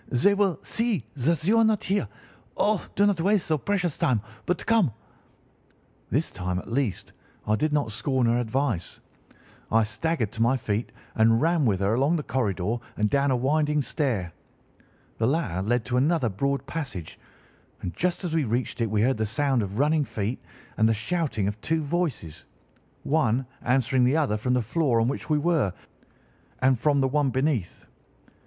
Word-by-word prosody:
They 135 +12 +4
will 200 -4 +1
see 225 - -1
that 155 +4 0
you 225 +2 +5
are - - +5
not 220 -2 +2
there. 195 - 0 0.5
Oh, 210 -2 +1
do 200 - +4
not 200 -5 +2
waste 200 +1 +3
the 160 - +1
so - - +2
precious 180 -2 -1
time, 125 -4 +2 0.3
but 180 - -1
come!' 225 - +3 1.2
"This - - 0
time, 90 0 -3
at 90 - -6
least, 125 -5 -2 0.3
I 105 - +2
did 155 +8 0
not 145 -7 0
scorn 125 +3 0
her 120 +1 +2
advice. 120 -5 -2 0.7
I 115 0 +4
staggered 115 +2 -1
to 115 - -5
my 120 +3 +3
feet 110 -1 -2 0.2
and 115 +1 +4
ran 165 0 +2
with 100 -4 +1
her 100 +2 +2
along 140 +8 +2
the 155 - -2
corridor 110 -4 -1 0.2
and 105 0 +1
down 140 0 +2
a 130 - +3
winding 150 +3 +1
stair. 115 - -2 0.9
The 115 - +2
latter 125 - 0
led 115 +3 0
to 125 +2 -1
another 140 -2 +2
broad 140 +8 -1
passage, 125 - -5 0.6
and 90 - -3
just 180 +2 -1
as 175 -3 -3
we 160 -2 +2
reached 120 0 -2
it 115 - +1
we 105 0 +1
heard 130 +1 +2
the 110 0 -1
sound 135 +1 +1
of 100 0 -4
running 150 +3 +3
feet 110 -1 -3 0.4
and 110 0 +4
the 115 - +2
shouting 130 - -1
of 105 +1 -4
two 160 0 0
voices, 145 - -3 0.6
one 135 -4 +1 0.2
answering 130 0 +2
the 135 +5 +3
other 145 -9 +1
from 125 +4 0
the 125 - +1
floor 130 -1 +1
on 115 - +2
which 140 - -4
we 150 - +3
were 150 - +1 0.9
and 130 -2 +2
from 145 +1 +2
the 135 - +3
one 145 +1 +1
beneath. 130 - -1
130 Hz, 185 wpm, -26 LUFS, 110-155 Hz, 1.2 s, you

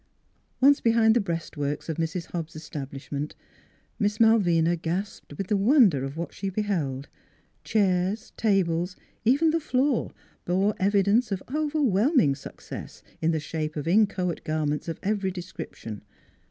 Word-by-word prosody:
Once 280 +2 +5
behind 225 -1 +4
the 240 - +4
breastworks 155 -5 -3
of 160 - -3
Mrs. 165 +1 -2
Hobbs' 165 -2 -5
establishment 145 -1 -6 0.6
Miss 210 -1 0
Malvina 175 -7 +4
gasped 170 -2 -4
with 195 - -2
the 210 - +1
won 230 +3 +6
der 140 -5 -2
of 135 +3 -5
what 170 - -4
she 195 - -3
beheld: 170 -10 -2 0.6
chairs, 195 0 0
tables, 185 -4 +1 0.3
even 285 +7 +4
the 330 - +1
floor 265 -3 0 0.3
bore 190 +4 +1
evidence 200 +4 +3
of 190 -1 -2
overwhelming 285 - +2
success 135 - -9 0.2
in 160 - +2
the 160 -1 +1
shape 155 0 -4
of 150 0 -4
inchoate 185 -2 +2
garments 155 -1 -1
of 165 - -4
every 200 -2 0
descrip 180 -2 -7
tion. 105 -3 -8
185 Hz, 140 wpm, -26 LUFS, 160-215 Hz, 0.6 s, won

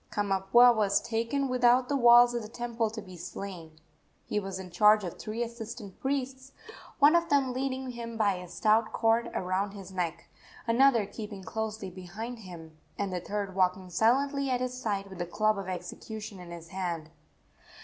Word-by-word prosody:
Kamapuaa 205 +4 +4
was 200 -2 +3
taken 235 +5 -1
without 250 0 +3
the 285 - 0
walls 240 -1 +7
of 240 - -1
the 215 - -7
temple 235 0 -2
to 220 -1 -7
be 185 -2 -11
slain. 175 -2 -8 0.5
He 210 - -1
was 195 -2 -5
in 185 -1 -8
charge 210 +4 +5
of 175 - -6
three 220 +2 -3
assistant 230 -3 -8
priests, 265 -1 -3 0.4
one 295 +3 +6
of 340 0 +2
them 275 -3 +2
leading 260 0 -3
him 235 -1 -7
by 205 -3 +3
a 180 0 -8
stout 220 +4 +2
cord 230 +1 +2
around 190 +2 -1
his 195 -2 -10
neck, 175 -3 -3 0.4
another 235 -1 +4
keeping 205 -1 -8
closely 220 -2 -4
behind 205 +7 -7
him, 165 -6 -11 0.2
and 200 -2 -2
the 180 - -2
third 200 +1 -3
walking 185 0 0
silently 275 - +2
at 250 -1 +1
his 250 0 -2
side 210 -6 -2
with 190 -2 -11
the 175 - -2
club 215 +3 +1
of 195 - -6
execution 200 +3 -7
in 175 -1 -10
his 170 -1 -9
hand. 170 -5 -4
215 Hz, 180 wpm, -29 LUFS, 190-240 Hz, 0.5 s, walls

